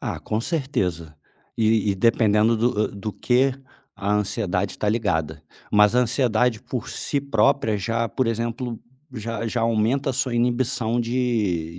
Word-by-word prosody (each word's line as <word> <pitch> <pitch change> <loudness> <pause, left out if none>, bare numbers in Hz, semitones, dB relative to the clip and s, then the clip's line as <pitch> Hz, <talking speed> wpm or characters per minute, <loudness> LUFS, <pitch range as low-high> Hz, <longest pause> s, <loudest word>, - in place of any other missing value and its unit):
Ah, - - -4
com 110 +1 -2
certeza, 90 - -2 0.4
e 110 -2 +2
e - - -3
dependendo 110 +1 +3
do 110 -2 +1
do 100 +1 -6
que 130 +2 +2 0.4
a 100 -1 -1
ansiedade 100 -2 -1
está 105 - -2
ligada, 80 -9 -1 0.3
mas 105 +1 +5
a 125 - +5
ansiedade 120 -2 +1
por 125 -4 -5
si 140 - -2
própria 130 -3 +2
já, 115 +3 -1
por 130 - -1
exemplo, 115 +1 -3 0.4
já 115 0 -4
já 115 +1 -2
aumenta 115 +5 +1
a - - -3
sua 130 -1 -1
inibição 120 0 0
de 110 -9 -1
115 Hz, 150 wpm, -23 LUFS, 105-125 Hz, 0.4 s, mas